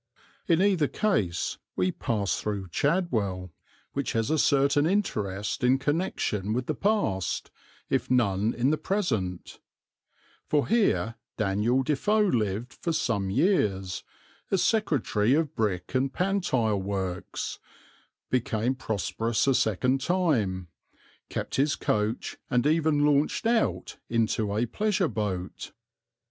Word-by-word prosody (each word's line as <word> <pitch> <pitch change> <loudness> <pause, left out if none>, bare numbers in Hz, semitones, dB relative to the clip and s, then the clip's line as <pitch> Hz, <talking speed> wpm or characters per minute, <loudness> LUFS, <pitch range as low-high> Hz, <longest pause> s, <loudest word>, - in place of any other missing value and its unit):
In 170 +2 +4
either 185 -7 +3
case 105 - 0 0.2
we 90 0 +1
pass 105 -4 -1
through 100 -3 -3
Chadwell, 110 - 0 0.4
which 140 -1 -2
has 115 +2 0
a 155 - +2
certain 140 +2 +3
interest 105 - -1
in 125 +2 +5
connection 135 - -1
with 125 +2 -1
the - - -1
past, 195 - 0 0.4
if - - 0
none 110 -4 +2
in 125 +4 +2
the 155 - 0
present, 115 - -2 0.9
for 150 -2 +1
here 115 - +2 0.2
Daniel 110 +6 +1
Defoe 180 +10 +2
lived 115 - -1
for 170 - -3
some 115 -11 0
years, 95 - +1 0.5
as 190 -2 +2
secretary 145 - +2
of 160 -2 0
brick 95 -5 -1
and 130 +1 +1
pantile 130 - 0
works, 95 -2 -4 0.7
became 120 -1 +1
prosperous 115 -1 -1
a 135 - +4
second 125 +4 +1
time, 125 - 0 0.6
kept - - -3
his 145 +2 +2
coach, 105 +2 -1
and 125 +1 +2
even 155 -1 +3
launched 150 +7 +2
out 230 0 0
into 110 -2 0
a 115 - +2
pleasure 200 - 0
boat. 100 -7 -4
125 Hz, 120 wpm, -27 LUFS, 100-155 Hz, 0.9 s, in